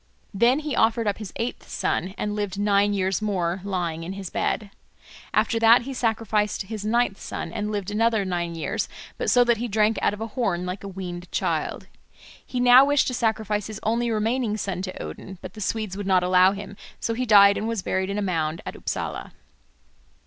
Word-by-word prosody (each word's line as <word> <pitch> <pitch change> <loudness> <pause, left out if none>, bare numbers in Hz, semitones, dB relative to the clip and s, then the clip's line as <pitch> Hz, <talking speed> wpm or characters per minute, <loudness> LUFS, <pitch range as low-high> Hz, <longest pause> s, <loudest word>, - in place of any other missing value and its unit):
Then 240 +8 +3
he 300 -2 -3
offered 225 +1 +2
up 205 - -1
his 210 -3 -7
eighth 235 +2 -4
son, 190 +2 -2
and 210 0 -2
lived 205 -2 -3
nine 205 0 +3
years 190 0 0
more, 185 -3 -1
lying 175 -4 -2
in 180 +3 -5
his 195 -2 -7
bed. 210 -3 -1 0.6
After 230 - +2
that 230 +1 +6
he 270 +2 -5
sacrificed 220 -4 0
his 210 +1 -6
ninth 225 -1 +1
son, 165 - -5
and 210 0 -2
lived 205 -1 -3
another 220 -1 +2
nine 175 -2 -2
years, 165 - -2 0.3
but - - 0
so 245 - +6
that 240 -1 +2
he 240 +3 -3
drank 215 0 +2
out - - +2
of - - -14
a 225 - -3
horn 205 -7 -1
like 180 +2 -5
a - - -5
weaned 180 -2 -7
child. - - -1 0.6
He 250 - -4
now 250 +1 +8
wished 285 0 +3
to - - -4
sacrifice 220 -3 0
his 215 -1 -7
only 235 +2 +1
remaining 225 0 0
son 195 -3 -3
to 185 -1 -6
Odin, 190 -1 -8
but 185 +1 -9
the 215 - -9
Swedes 215 -1 -2
would 200 -1 -5
not 185 -2 +4
allow 185 +1 +5
him. 200 0 -8 0.2
So 230 - -1
he 250 +2 -2
died 200 -2 +7
and 220 - -2
was 225 -5 -2
buried 190 0 -1
in 200 - -2
a 210 - 0
mound 165 -4 -1
at - - -6
Upsala. - - -4
205 Hz, 205 wpm, -24 LUFS, 190-225 Hz, 0.6 s, now